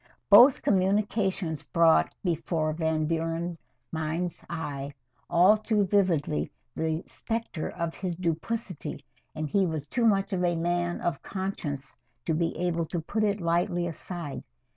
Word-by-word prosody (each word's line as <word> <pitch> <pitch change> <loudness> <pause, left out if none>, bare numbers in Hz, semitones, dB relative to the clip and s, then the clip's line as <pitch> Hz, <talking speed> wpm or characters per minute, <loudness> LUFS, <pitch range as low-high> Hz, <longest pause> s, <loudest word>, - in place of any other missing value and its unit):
Both 245 +7 +8
communications 195 -4 +1
brought 165 0 +4
before 165 -3 0
Van 160 -1 0
Buren's 165 +1 -2 0.3
mind's 160 +2 -2
eye 145 -3 -4 0.3
all 180 +5 +6
too 215 -1 +1
vividly 175 - +1 0.3
the 160 +1 -1
specter 225 -8 -4
of 170 -1 -3
his 180 -3 -3
duplicity, 180 +2 -3 0.3
and 155 0 -2
he 190 +5 +2
was 155 -3 -3
too 235 - 0
much 195 -2 +2
of 180 -1 0
a 175 -1 +2
man 175 +1 -1
of 175 -2 -1
conscience 160 -8 -4 0.3
to 160 - +1
be 165 +1 0
able 170 -1 0
to 175 - -2
put 210 +7 -1
it 205 -1 +1
lightly 175 +1 +1
aside. 170 -2 -5
170 Hz, 140 wpm, -28 LUFS, 160-190 Hz, 0.3 s, Both